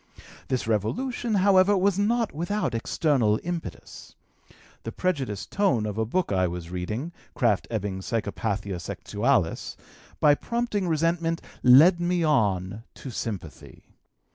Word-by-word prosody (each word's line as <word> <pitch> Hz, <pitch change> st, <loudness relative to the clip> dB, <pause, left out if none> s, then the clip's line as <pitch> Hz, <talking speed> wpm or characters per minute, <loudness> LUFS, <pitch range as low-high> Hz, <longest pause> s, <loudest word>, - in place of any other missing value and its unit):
This 130 Hz, -2 st, -1 dB
revolution, 225 Hz, -, -1 dB
however, 195 Hz, 0 st, +4 dB
was 195 Hz, +1 st, +2 dB
not 230 Hz, +2 st, +1 dB
without 175 Hz, -, -2 dB
external 115 Hz, -2 st, +1 dB
impetus. 175 Hz, -1 st, -7 dB, 0.7 s
The 115 Hz, -, -6 dB
prejudiced 135 Hz, -, -2 dB
tone 135 Hz, -, +1 dB
of 105 Hz, 0 st, -4 dB
a 110 Hz, -, 0 dB
book 180 Hz, -, -1 dB
I 95 Hz, -2 st, +2 dB
was 85 Hz, -1 st, -6 dB
reading, 105 Hz, -, -4 dB, 0.2 s
Krafft 115 Hz, -6 st, +1 dB
Ebing's 100 Hz, -4 st, -4 dB
Psychopathia 105 Hz, -3 st, -2 dB
Sexualis, 105 Hz, -2 st, -1 dB, 0.4 s
by 150 Hz, -, +6 dB
prompting 235 Hz, +1 st, -2 dB
resentment, 165 Hz, +1 st, 0 dB, 0.2 s
led 155 Hz, +9 st, +7 dB
me 175 Hz, 0 st, +1 dB
on 105 Hz, -, +1 dB
to 135 Hz, -, -8 dB
sympathy. 100 Hz, -9 st, -7 dB
135 Hz, 120 wpm, -26 LUFS, -, 0.7 s, led